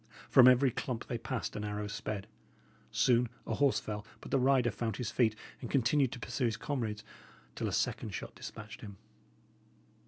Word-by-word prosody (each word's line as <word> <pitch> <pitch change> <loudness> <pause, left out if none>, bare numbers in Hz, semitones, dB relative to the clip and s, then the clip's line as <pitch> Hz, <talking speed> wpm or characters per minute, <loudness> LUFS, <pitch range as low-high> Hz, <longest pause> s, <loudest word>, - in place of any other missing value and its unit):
From 130 -1 +9
every 130 +1 +6
clump 120 0 -3
they 120 - -3
passed 115 -1 -3
an 105 - -3
arrow 105 0 -3
sped. 105 -1 -4 0.6
Soon 120 -1 +3 0.2
a - - -2
horse 140 -2 +3
fell, 105 -1 -5 0.2
but - - -10
the 135 - +3
rider 130 -2 +4
found 110 -1 -3
his 125 -4 -3
feet 110 -4 +3 0.3
and 120 - -5
continued 135 0 +3
to 125 - -7
pursue 125 +4 -2
his 115 -1 0
comrades 115 -5 -3 0.5
till - - -2
a - - -2
second - - 0
shot - - -6
despatched 105 -2 -9
him. 100 -2 -9
120 Hz, 180 wpm, -33 LUFS, 105-130 Hz, 0.6 s, From